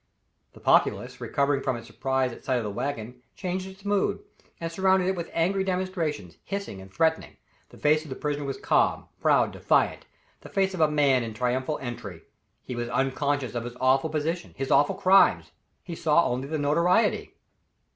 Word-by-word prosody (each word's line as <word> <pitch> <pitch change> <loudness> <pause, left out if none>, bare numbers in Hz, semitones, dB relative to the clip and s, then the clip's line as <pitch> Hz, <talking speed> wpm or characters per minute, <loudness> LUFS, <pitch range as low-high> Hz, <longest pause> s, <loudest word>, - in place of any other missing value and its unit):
The - - -15
populace, - - +2
recovering 140 0 0
from 130 -3 -1
its 115 - -10
surprise 130 +2 -1
at - - -12
sight 130 - 0
of 120 - 0
the 105 - -3
wagon, 125 +1 -4
changed 185 0 -3
its 190 +1 -13
mood, 205 0 +1 0.4
and 165 0 -4
surrounded 190 +1 +2
it 190 - 0
with 170 -1 -5
angry 190 +4 +1
demonstrations, 180 - -3
hissing 200 - -5
and 95 0 -13
threatening. 160 +10 0 0.3
The - - -15
face 155 +1 +3
of 155 - -12
the 130 - -5
prisoner 145 0 -3
was 135 -1 -4
calm, - - +1
proud, - - +3
defiant - - +1 0.3
the - - -12
face 195 -1 +1
of 180 - -3
a 155 - +5
man 140 -4 +3
in 115 -2 -5
triumphal 130 +5 -1
entry. 105 -8 -7 0.4
He 125 - -6
was 120 0 -3
unconscious 135 +1 -1
of 120 -1 -3
his 120 +1 -8
awful 135 +4 +3
position, 160 +3 -3
his 135 0 -3
awful 145 - +4
crimes. 195 +1 +4 0.3
He 175 - -7
saw 165 0 +3
only 125 +2 -2
the 155 +2 -2
notoriety. 170 +8 +2
145 Hz, 185 wpm, -26 LUFS, 125-175 Hz, 0.4 s, a